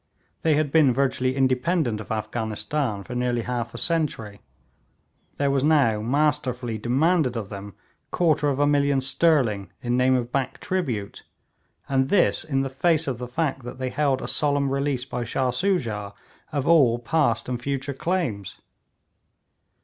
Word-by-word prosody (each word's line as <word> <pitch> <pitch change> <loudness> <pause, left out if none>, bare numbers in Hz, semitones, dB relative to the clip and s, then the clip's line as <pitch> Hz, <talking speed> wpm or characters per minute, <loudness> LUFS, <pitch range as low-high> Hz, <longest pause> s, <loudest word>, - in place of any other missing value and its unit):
They 160 -2 +3
had 150 -2 0
been 150 -4 +5
virtually 130 0 0
independent 130 -2 +1
of 110 - -10
Afghanistan 110 +1 -2
for 125 - -8
nearly 125 -1 -1
half 120 -1 -4
a - - -5
century; 135 -12 -2 1.0
there 140 -1 +1
was 135 -1 +1
now 140 -9 +3
masterfully 125 -3 0
demanded 135 - +1
of 105 -3 -5
them 100 0 -8 0.3
quarter 155 -4 +2
of 140 -1 -1
a 145 - +4
million 140 -1 +2
sterling 130 - +1
in 120 -1 -1
name 130 +1 +3
of 120 -1 -2
back 135 -1 -2
tribute, 135 - -3 0.7
and 135 -1 +1
this 200 - +3
in 135 -4 -1
the 135 - -1
face 160 +3 +2
of 125 -3 -3
the 125 - -5
fact 135 +1 -2
that 120 - -8
they 130 0 -3
held 140 -3 0
a - - -4
solemn 145 -2 +1
release 140 -2 -1
by 125 -2 -4
Shah 125 +2 -1
Soojah 120 - -1 0.4
of 145 -2 -2
all 140 -8 +5
past 120 -1 0
and 125 -1 -3
future 140 +1 -3
claims. 135 - -2
130 Hz, 155 wpm, -24 LUFS, 120-145 Hz, 1.0 s, been